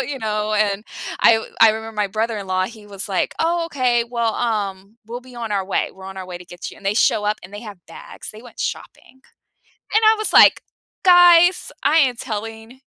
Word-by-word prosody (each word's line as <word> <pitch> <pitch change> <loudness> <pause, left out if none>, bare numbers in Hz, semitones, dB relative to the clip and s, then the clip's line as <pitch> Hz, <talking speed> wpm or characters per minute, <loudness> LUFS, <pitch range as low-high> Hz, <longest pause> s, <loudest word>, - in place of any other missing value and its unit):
You 270 - -5
know? 215 -2 -2
And 210 0 0 0.4
I 225 -1 +4 0.2
I 225 - +8
remember 220 +1 -6
my 210 -1 0
brother-in-law, 200 -3 -2
he 215 -2 -13
was 200 0 -7
like, 190 - -1
"Oh, 335 +1 0
okay. 250 -6 0
Well, 235 -1 -2
um, 205 -2 -3
we'll 240 +2 -7
be 255 -1 -16
on 230 -3 -5
our 195 -2 -1
way. 190 - -1
We're 190 - -14
on 190 0 -9
our 190 -1 -7
way 180 -1 -8
to 180 - -13
get 175 0 -9
you." - - -14
And - - -18
they 200 +1 0
show 210 -2 +2
up, 210 +1 -1
and 180 - -13
they 205 - -7
have 210 -5 -10
bags. 165 - -10
They 215 - -13
went 245 - -13
shopping. 260 - -7 0.7
And 435 +1 +3
I 440 +1 +6
was 430 - -2
like, - - +7 0.4
"Guys, 355 0 +6
I 315 - +3
am 265 -5 +3
telling 225 +2 -7
220 Hz, 215 wpm, -20 LUFS, 200-245 Hz, 0.7 s, I